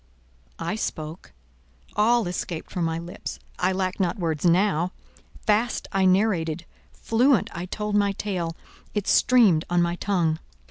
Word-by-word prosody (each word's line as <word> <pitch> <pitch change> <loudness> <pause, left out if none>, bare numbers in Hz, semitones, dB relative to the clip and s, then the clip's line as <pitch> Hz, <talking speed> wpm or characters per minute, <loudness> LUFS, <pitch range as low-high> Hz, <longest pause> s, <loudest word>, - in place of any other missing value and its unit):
I 210 - -3
spoke. 155 -5 -5 0.6
All 225 0 +3
escaped 175 -2 -4
from 175 -2 -1
my 165 0 -1
lips. 170 +1 -6 0.2
I 180 +1 +2
lacked 185 0 -2
not 180 -3 0
words 160 -5 -2
now; 180 0 +3 0.5
fast 220 +3 +1
I 195 -1 +2
narrated; 180 -4 +2 0.3
fluent 235 -1 +2
I 170 +2 -5
told 210 +2 -3
my 200 -1 +3
tale; 180 -5 -3 0.4
it 205 -2 -1
streamed 215 -11 +5
on 175 0 +2
my 170 0 0
tongue. 170 -6 0
185 Hz, 140 wpm, -25 LUFS, 170-210 Hz, 0.6 s, streamed